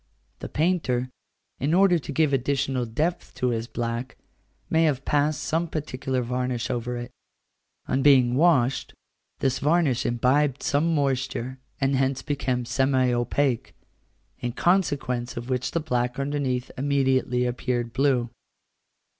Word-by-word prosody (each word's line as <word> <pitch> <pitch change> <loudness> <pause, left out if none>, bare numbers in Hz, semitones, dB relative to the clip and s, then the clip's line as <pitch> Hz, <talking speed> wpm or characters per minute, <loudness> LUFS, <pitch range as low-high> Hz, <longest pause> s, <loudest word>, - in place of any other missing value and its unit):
The - - -6
painter, 135 -7 0 0.5
in 150 +5 +1
order 185 -2 +5
to 150 - -7
give 150 0 +2
additional 135 -1 0
depth 155 +10 -2
to 125 - 0
his 115 -1 -2
black, 120 +1 -4 0.5
may 165 +1 +3
have 135 -4 0
passed 150 0 +1
some 165 +2 0
particular 130 -4 -3
varnish 125 0 -2
over 120 0 -3
it: 120 +1 -6 0.8
on 135 - +1
being 130 -4 +5
washed, 135 -4 +2 0.5
this 130 -1 +1
varnish 145 -4 +2
imbibed 130 +3 +1
some 160 +3 +1
moisture, 130 -2 -1 0.2
and 135 0 +1
hence 135 0 0
became 130 -4 -1
semi 130 0 +2
opaque, 120 +1 0 0.6
in 120 -1 -3
consequence 140 -10 0
of 120 +2 -5
which 125 0 0
the 170 - -1
black 125 -5 -1
underneath 135 -3 -2
immediately 130 -2 +1
appeared 120 -1 -2
blue. 130 -4 +1
130 Hz, 130 wpm, -25 LUFS, 125-145 Hz, 0.8 s, order